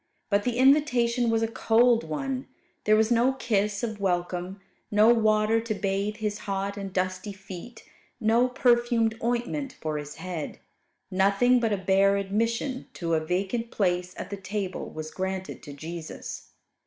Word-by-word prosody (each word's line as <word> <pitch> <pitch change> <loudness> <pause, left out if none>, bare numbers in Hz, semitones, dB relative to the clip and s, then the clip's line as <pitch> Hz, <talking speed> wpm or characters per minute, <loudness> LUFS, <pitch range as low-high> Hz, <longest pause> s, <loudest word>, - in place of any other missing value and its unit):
But 200 0 +2
the 245 -1 0
invitation 250 -3 +4
was 225 0 +2
a - - +2
cold 230 +1 +3
one. 255 - -3 0.4
There 215 - +5
was 220 +2 +3
no 240 +3 +4
kiss 210 -5 0
of 220 -3 -3
welcome, 180 0 -1 0.3
no 210 +2 +5
water 215 0 +3
to 225 -1 -3
bathe 200 +1 -1
His 210 -1 -3
hot 195 +1 -1
and 195 -1 -5
dusty 185 +2 -2
feet, 195 +4 -10 0.4
no 230 +3 +3
perfumed 240 -2 +2
ointment 245 +4 -1
for 155 -1 -3
His 150 0 -8
head: 170 -3 -5 0.5
nothing 200 +7 +4
but 225 -2 0
a 205 - +1
bare 195 +1 +3
admission 230 +6 -1
to 165 -1 -2
a 160 -1 +2
vacant 195 +8 -1
place 180 -3 0
at - - -6
the 200 - -3
table 195 0 -4
was 155 0 -7
granted 190 0 -4
to 145 - -9
Jesus. 160 +3 -7
210 Hz, 155 wpm, -27 LUFS, 190-235 Hz, 0.5 s, There